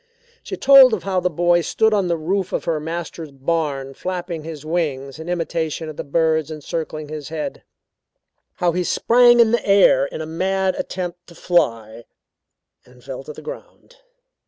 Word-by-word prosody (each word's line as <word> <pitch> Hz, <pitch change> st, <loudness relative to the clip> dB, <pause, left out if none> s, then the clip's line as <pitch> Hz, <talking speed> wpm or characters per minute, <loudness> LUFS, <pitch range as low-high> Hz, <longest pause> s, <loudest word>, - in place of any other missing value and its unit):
She 385 Hz, -, -6 dB
told 265 Hz, -4 st, +7 dB
of 195 Hz, -, -9 dB
how 190 Hz, -2 st, 0 dB
the 180 Hz, 0 st, 0 dB
boy 175 Hz, +1 st, +2 dB
stood 220 Hz, +6 st, +1 dB
on 200 Hz, -3 st, +1 dB
the 170 Hz, -1 st, 0 dB
roof 185 Hz, +4 st, -2 dB
of -, -, -1 dB
her 160 Hz, -2 st, 0 dB
master's 165 Hz, 0 st, -6 dB
barn 140 Hz, -1 st, -2 dB
flapping 175 Hz, -1 st, -5 dB
his 155 Hz, -2 st, -8 dB
arms 150 Hz, -4 st, -2 dB
in 160 Hz, +2 st, -7 dB
imitation 165 Hz, -2 st, -2 dB
of 155 Hz, -, -8 dB
the -, -, -5 dB
birds 160 Hz, +1 st, +1 dB
encircling 155 Hz, 0 st, -5 dB
his 155 Hz, -2 st, -7 dB
head; 155 Hz, -1 st, -5 dB, 0.9 s
how 175 Hz, -1 st, +1 dB
he 180 Hz, +2 st, -1 dB
sprang 240 Hz, +5 st, +4 dB
in 230 Hz, -2 st, +5 dB
the 235 Hz, -, +1 dB
air 195 Hz, -9 st, +4 dB
in -, -, -7 dB
a 160 Hz, -, -4 dB
mad 190 Hz, +4 st, 0 dB
attempt 175 Hz, -1 st, -5 dB
to 170 Hz, -, -15 dB
fly, 115 Hz, -10 st, 0 dB, 0.8 s
and 125 Hz, 0 st, -20 dB
fell 135 Hz, 0 st, -7 dB
to 150 Hz, -, -7 dB
the -, -, -12 dB
ground. -, -, -11 dB
165 Hz, 175 wpm, -21 LUFS, 155-185 Hz, 0.9 s, told